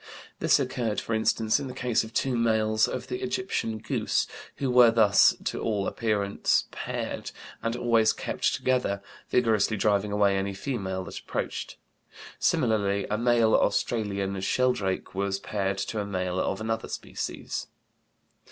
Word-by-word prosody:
This - - +4
occurred, 115 -4 -1
for 115 - -4
instance, 110 +1 +2
in 140 - -5
the 125 - -7
case 120 -3 +1
of 110 - -9
two 130 +2 0
males 110 -2 +2
of - - -4
the 375 +1 -5
Egyptian 380 - -2
goose 110 0 0 0.3
who 135 -2 -1
were 125 -1 +7
thus 110 -3 +5
to - - -3
all 105 -3 0
appearance 105 -3 0
paired, - - -4 0.3
and 115 0 -1
always 115 -2 +3
kept - - -1
together, 125 -6 0 0.3
vigorously 110 -3 +2
driving 100 0 +1
away 100 -1 +3
any 95 0 -2
female 95 -5 -3
that - - -7
approached. - - -4 0.6
Similarly 100 -2 +1
a 105 - +1
male 120 -2 +3
Australian 100 -4 0
sheldrake 100 -3 0
was 95 0 -1
paired 100 -1 -2
to 105 +3 -3
a - - -3
male 90 -2 -2
of - - -1
another 110 0 -2
species. - - -5
110 Hz, 145 wpm, -27 LUFS, 100-115 Hz, 0.6 s, were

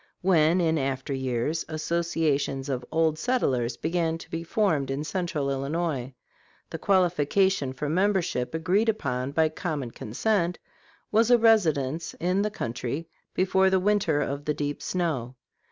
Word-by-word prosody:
When, 170 -1 +4
in 160 -2 +2
after 135 0 -2
years, 130 +4 -1
associations 155 -4 -1
of 130 -2 -2
"Old 160 -1 +1
Settlers" 130 - 0
began 165 0 0
to - - -13
be 165 - -3
formed 165 -7 +1
in 135 +2 -2
Central 155 -3 -2
Illinois, 135 -2 -2 0.6
the - - -5
qualification 185 -3 +2
for 135 +3 -4
membership 180 -6 0
agreed 185 +7 +2
upon 130 - -1
by 160 +2 +2
common 150 -6 -4
consent 175 - -1 0.5
was 225 +2 +4
a 245 - +7
residence 165 - +2
in 180 +3 0
the 210 - 0
country 125 - -4 0.3
before 190 +1 +3
"the 190 0 +3
winter 195 -6 +2
of 140 0 -3
the 150 - 0
deep 145 0 -3
snow." 145 -9 -2
160 Hz, 140 wpm, -26 LUFS, 140-185 Hz, 0.6 s, a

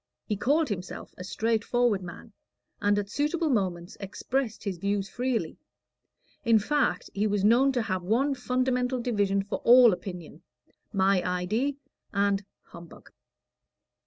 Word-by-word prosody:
He 210 - -1
called 290 +8 +1
himself 185 -3 -6
a 185 - -8
straight 220 +4 0
forward 240 -5 +1
man, 180 +5 -10 0.5
and 205 0 +2
at 205 -1 -1
suitable 300 - 0
moments 180 -6 -2
expressed 225 +4 -3
his 190 -4 -4
views 200 +1 -1
freely; 250 +2 -2 0.8
in 230 -3 +5
fact, 245 -3 0
he 205 +2 0
was 205 -1 0
known 245 +6 +5
to 245 -3 0
have 185 -4 -2
one 240 +10 +1
fundamental 250 0 0
division 205 -5 0
for 200 - -4
all 240 -2 +7
opinion 180 -3 -8 0.5
"my 195 -2 +3
idee" 210 +11 -1 0.3
and 200 0 +1 0.2
"humbug." 170 -1 -14
210 Hz, 135 wpm, -27 LUFS, 195-250 Hz, 0.8 s, all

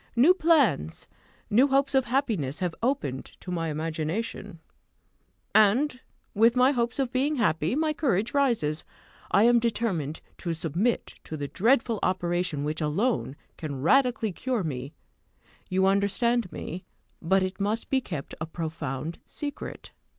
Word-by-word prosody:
New 275 +10 +6
plans, 300 - +2 0.4
new 245 +7 +4
hopes 275 0 +2
of 265 -2 +3
happiness, 225 - 0
have 180 -3 -2
opened 160 - -1 0.2
to 180 - -7
my 165 -2 -1
imagination, 165 +5 -3 0.9
and, 245 +6 +4 0.3
with 230 +3 +4
my 250 +2 +5
hopes 240 -3 -1
of 265 -3 0
being 280 +3 +1
happy, 175 - +1
my 310 +1 +1
courage 235 - 0
rises. 230 - +1 0.5
I 200 - +4
am 240 +1 +6
determined 205 -10 -1 0.2
to 170 -2 -2
submit 170 - -1
to 155 - -5
the 145 -1 -3
dreadful 230 - +2
operation 175 -4 0
which 155 +2 -2
alone 155 - 0 0.2
can 140 -4 -5
radically 250 - +3
cure 245 +3 -2
me 135 -3 -4 0.8
you 190 0 +2
understand 200 +3 +2
me; 180 +3 -6 0.4
but 190 +3 +2
it 185 +1 -4
must 215 +3 -1
be 265 -1 +3
kept 155 - -6
a 155 - -2
profound 160 -2 -4
secret. 290 -1 -7
200 Hz, 140 wpm, -27 LUFS, 160-250 Hz, 0.9 s, New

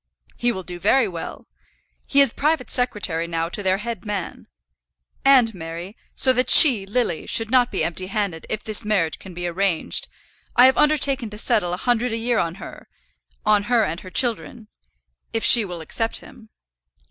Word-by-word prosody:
"He 240 0 0
will 190 -5 -6
do 175 0 -8
very 260 +4 +2
well. 170 -3 -8 0.6
He 280 - +3
is 275 -5 +2
private 300 -2 -1
secretary 195 -9 -2
now 165 0 -3
to 205 - -3
their 190 -1 0
head 230 +2 -6
man. 205 -2 -6 0.8
And, 255 -5 +4
Mary, 170 +3 -8 0.2
so 260 - +3
that 255 +1 0
she, 235 -11 +8
Lily, 205 -6 -2
should 225 0 0
not 250 -1 +3
be - - -2
empty 185 +2 -3
handed 195 -5 -4
if 215 - -4
this 215 0 +3
marriage 195 -7 -1
can 185 -2 -12
be 175 0 -5
arranged, 175 -1 0 0.5
I 245 - +7
have 260 - +5
undertaken 280 -5 +1
to 210 - -10
settle 180 -4 0
a - - -3
hundred 245 +2 -1
a - - -2
year 235 0 -1
on 170 0 -2
her, - - -12 0.6
on 210 -1 +2
her 240 -2 +3
and 165 -2 -4
her 185 - -12
children, 230 +1 0 0.6
if 225 - -2
she 235 -2 +6
will 175 -3 -8
accept 225 +8 -2
him. 220 - -16
215 Hz, 180 wpm, -21 LUFS, 180-245 Hz, 0.8 s, she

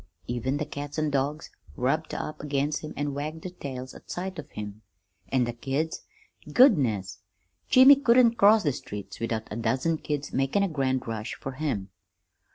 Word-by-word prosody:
Even 125 +3 -1
the 150 - -2
cats 145 +1 -6
an' 155 -1 0
dogs 140 +2 -1 0.2
rubbed 135 +5 -1
up 155 - -5
against 145 0 -1
him 155 - -7
an' 145 -1 -1
wagged 155 +3 -5
their 185 - -5
tails 130 -7 -7
at - - -15
sight 185 -1 -4
of 150 -1 -8
him, 105 0 -7 0.5
an' 130 -2 +2
the 120 0 -2
kids 140 +7 -2 0.5
goodness, 120 - +4 0.5
Jimmy 265 +2 +9
couldn't 240 -3 +5
cross 215 -1 +5
the 145 -4 +1
street 100 -4 -7
without 115 -1 -2
a - - -3
dozen 130 +8 0
kids 145 -1 -4
makin' 135 +9 +1
a - - +2
grand 135 -6 -1
rush 110 0 -4
fer 135 - -6
him. 130 -9 -3
145 Hz, 170 wpm, -27 LUFS, 125-160 Hz, 0.5 s, Jimmy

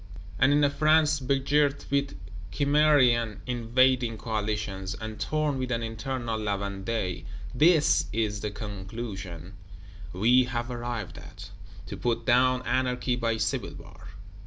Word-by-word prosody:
And 135 - +5
in 145 +1 +3
a 145 - +4
France 155 0 +3
begirt 140 +2 +1
with 140 -5 0 0.3
Cimmerian 140 -7 +3
invading 125 0 +1
Coalitions, 105 -3 -3
and 110 -1 -7
torn 155 -3 -1
with 130 0 -3
an 115 -1 -1
internal 115 0 -3
La 105 -2 -1
Vendée, 100 -2 -3 0.3
this 155 +3 +4
is 105 -2 -1
the 105 - -2
conclusion 95 -4 -7 0.6
we 120 +8 +4
have 120 0 -4
arrived 120 -4 -5
at: 95 +1 -12 0.3
To 95 - -7
put 115 -1 -1
down 130 +1 +3
Anarchy 125 0 0
by 115 -2 -1
Civil 110 0 -2
War! 95 - -13
120 Hz, 130 wpm, -27 LUFS, 105-130 Hz, 0.6 s, And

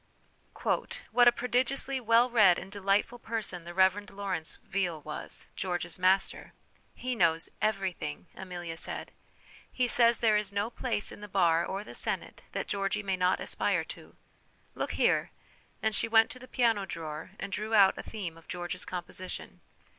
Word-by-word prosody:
" - - -20 0.5
What 245 -1 +6
a - - +10
prodigiously 255 +2 0
well 235 +1 +4
read 210 -7 +6
and 190 - -7
delightful 200 +4 +1
person 220 -7 -4
the 175 - -7
Reverend 190 +2 +3
Lawrence 195 -5 -3
Veal 180 -4 -1
was, 150 +1 -6
George's 175 -2 -2
master! 190 +1 +2 0.2
' - - -35
He 255 -1 0
knows 165 -5 +2
everything' 190 - -1
Amelia 175 -3 -6
said. - - -3 0.3
' - - -23
He 250 -1 +1
says 235 -1 +4
there 220 -2 +4
is 210 -1 -1
no 205 +3 -1
place 235 -4 -2
in - - -11
the 210 - -7
bar 170 -4 +3
or 195 +3 -3
the - - -10
senate - - -2
that - - -2
Georgy 200 +1 -1
may 195 -1 0
not 185 0 +2
aspire - - 0
to. - - -16 0.6
Look - - -3
here/ - - +2 0.5
and 220 0 +2
she 220 - +2
went 225 0 +5
to 255 - -7
the 255 - -11
piano 230 -5 +2
drawer 160 +2 -6
and 195 - -5
drew 215 +2 -1
out 195 -2 +7
a - - -5
theme 180 -7 -6
of 165 - -22
George's 180 +1 -4
composition. 180 +1 -6
195 Hz, 175 wpm, -30 LUFS, 180-225 Hz, 0.6 s, a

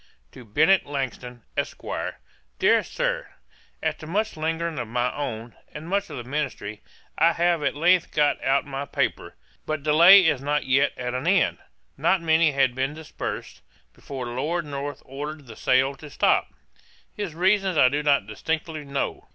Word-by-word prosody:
'To - - -12
BENNET 160 - +3
LANGTON, 125 -4 -5
ESQ. - - -4 0.7
'DEAR - - +4
SIR, - - -2 0.6
'After 155 - -3
much 210 +6 -1
lingering 160 0 -2
of 120 - -4
my 120 +2 -1
own, 120 -5 -5 0.2
and 155 +2 -7
much 200 +2 -1
of - - -7
the 120 - -5
ministry, 130 -6 -4 0.4
I 165 +1 +5
have 170 -1 +1
at - - 0
length 175 +3 +3
got 150 -1 +1
out 135 +1 +2
my 140 0 -5
paper. - - -2 0.3
But 155 -2 -2
delay 170 +6 +8
is 150 -5 +2
not 145 +1 -1
yet 135 +2 +2
at 125 -1 -3
an 130 +5 -3
end: 185 -1 +3 0.4
Not 190 - +2
many 160 -1 +3
had 135 -3 +2
been 135 +3 -2
dispersed, 160 -1 -6 0.3
before 135 -3 -7
Lord 150 +8 -2
North 145 0 -5
ordered 145 +2 -7
the 115 -3 -11
sale 130 +4 +2
to 150 - -11
stop. - - +2 0.6
His 200 -7 -5
reasons 190 0 +2
I 130 - +7
do 145 +3 0
not 145 -7 +2
distinctly 155 - -4
know. 140 -1 -4
145 Hz, 165 wpm, -25 LUFS, 130-165 Hz, 0.7 s, delay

